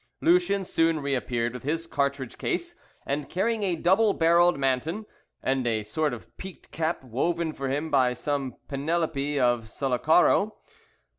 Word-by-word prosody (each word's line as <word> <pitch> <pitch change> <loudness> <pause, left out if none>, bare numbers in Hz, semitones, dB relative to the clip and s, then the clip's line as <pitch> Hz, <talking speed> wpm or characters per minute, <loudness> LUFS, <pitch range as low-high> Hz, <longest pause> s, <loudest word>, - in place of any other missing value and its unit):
Lucien 180 +3 +3
soon 165 -3 +1
re 140 -1 -2
appeared 120 -2 -1
with 125 - -7
his 160 +5 -2
cartridge 140 -4 -2
case, 345 -1 -2 0.3
and 145 +1 -2
carrying 215 +4 0
a 190 -4 0
double 195 +6 +3
barrelled 170 +1 +4
Manton, 140 - -1 0.4
and 130 -2 0
a 110 -2 0
sort 150 +8 -1
of 110 -8 -9
peaked 190 -1 -10
cap, 160 -2 -2
woven 160 +7 -1
for 135 -2 -4
him 145 +4 -2
by 130 -3 +3
some 135 -1 -3
Penelope 145 -1 -1
of 120 -2 +2
Sullacaro. 155 - +2
150 Hz, 150 wpm, -26 LUFS, 130-175 Hz, 0.4 s, barrelled